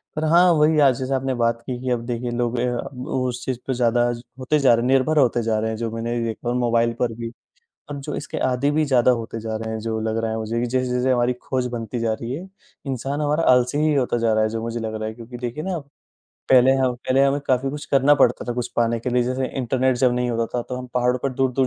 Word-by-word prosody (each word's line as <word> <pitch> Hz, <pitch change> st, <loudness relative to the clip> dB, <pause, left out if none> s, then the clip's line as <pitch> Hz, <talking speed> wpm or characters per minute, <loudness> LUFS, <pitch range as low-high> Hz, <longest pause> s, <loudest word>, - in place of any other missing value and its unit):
पर 155 Hz, -, -2 dB
हाँ, 170 Hz, +3 st, +5 dB
वही 155 Hz, -1 st, +3 dB
आज 135 Hz, -3 st, +5 dB
जैसा 135 Hz, +1 st, -1 dB
आपने 130 Hz, 0 st, -1 dB
बात 115 Hz, 0 st, 0 dB
की 125 Hz, -1 st, -4 dB
कि 130 Hz, -, -3 dB
अब 120 Hz, -1 st, -1 dB
देखिए, 120 Hz, 0 st, -3 dB
लोग 120 Hz, 0 st, -1 dB
अ, -, -, 0 dB
अब 125 Hz, +1 st, -7 dB
उस 125 Hz, -1 st, -2 dB
चीज़ 130 Hz, -2 st, -2 dB
पे 135 Hz, -, 0 dB
ज़्यादा 120 Hz, 0 st, +2 dB
ज 120 Hz, -, -8 dB, 0.2 s
होते 130 Hz, +4 st, +1 dB
जा 135 Hz, -4 st, +5 dB
रहे 115 Hz, +1 st, +1 dB
निर्भर 135 Hz, +4 st, +2 dB
होते 120 Hz, -3 st, +3 dB
जा 110 Hz, -1 st, 0 dB
रहे 110 Hz, -, -1 dB
हैं 110 Hz, -, -4 dB
जो 115 Hz, 0 st, -2 dB
मैंने 115 Hz, +1 st, -3 dB
भी 115 Hz, -, -1 dB
देखा, 115 Hz, +1 st, -4 dB
और 120 Hz, -, 0 dB
मोबाइल 120 Hz, -1 st, +2 dB
पर 120 Hz, -2 st, 0 dB
भी, 115 Hz, 0 st, -6 dB, 0.6 s
और 145 Hz, -, -5 dB
जो 140 Hz, +2 st, -5 dB
इसके -, -, -5 dB
आदी 130 Hz, +2 st, +1 dB
भी 155 Hz, +1 st, +2 dB
ज़्यादा 130 Hz, -3 st, +4 dB
होते 115 Hz, 0 st, -6 dB
जा 110 Hz, 0 st, -4 dB
रहे 110 Hz, 0 st, -5 dB
हैं 110 Hz, -, -3 dB
जो 110 Hz, 0 st, -2 dB
लग 110 Hz, 0 st, -1 dB
रहा 110 Hz, -, -1 dB
है 110 Hz, -, -2 dB
मुझे, 110 Hz, +1 st, -2 dB
कि 120 Hz, -, 0 dB
जैसे-जैसे 125 Hz, +1 st, 0 dB
हमारी 120 Hz, 0 st, +2 dB
खोज 130 Hz, -1 st, -2 dB
बनती 115 Hz, 0 st, -4 dB
जा 115 Hz, -1 st, 0 dB
रही 115 Hz, +3 st, -5 dB
है, 180 Hz, +6 st, -8 dB, 0.4 s
इंसान 135 Hz, +2 st, -3 dB
हमारा 150 Hz, +2 st, +1 dB
आलसी 125 Hz, +3 st, +2 dB
ही 155 Hz, 0 st, +2 dB
होता 125 Hz, -3 st, +1 dB
जा 115 Hz, -1 st, +1 dB
रहा 110 Hz, 0 st, +2 dB
है 110 Hz, -, +1 dB
जो 115 Hz, 0 st, -4 dB
मुझे 115 Hz, 0 st, -3 dB
लग 110 Hz, -1 st, -4 dB
रहा 110 Hz, 0 st, -3 dB
है। -, -, -7 dB
क्योंकि 120 Hz, +1 st, -9 dB
देखिए 125 Hz, +5 st, -4 dB
ना, 185 Hz, -1 st, -2 dB, 0.7 s
पहले 130 Hz, 0 st, +6 dB
हम 130 Hz, -2 st, +1 dB
पहले 130 Hz, +2 st, +1 dB
हमें 140 Hz, +1 st, +1 dB
काफ़ी 130 Hz, +1 st, +1 dB
कुछ 150 Hz, +1 st, -6 dB
करना 140 Hz, +1 st, +4 dB
पड़ता 125 Hz, -3 st, +2 dB
था -, -, 0 dB
कुछ 125 Hz, -1 st, -3 dB
पाने 115 Hz, -1 st, +1 dB
के 125 Hz, -, -3 dB
लिए, 125 Hz, 0 st, +2 dB
जैसे 130 Hz, +2 st, -1 dB
इंटरनेट 130 Hz, 0 st, +1 dB
जब 125 Hz, -1 st, +3 dB
नहीं 125 Hz, 0 st, 0 dB
होता 115 Hz, -1 st, 0 dB
था 120 Hz, -, -1 dB
तो 125 Hz, -, -4 dB
हम 125 Hz, -, -7 dB
पहाड़ों 125 Hz, 0 st, +2 dB
पर 135 Hz, -, 0 dB
दूर-दूर 130 Hz, 0 st, +1 dB
125 Hz, 270 wpm, -22 LUFS, 115-130 Hz, 0.7 s, पहले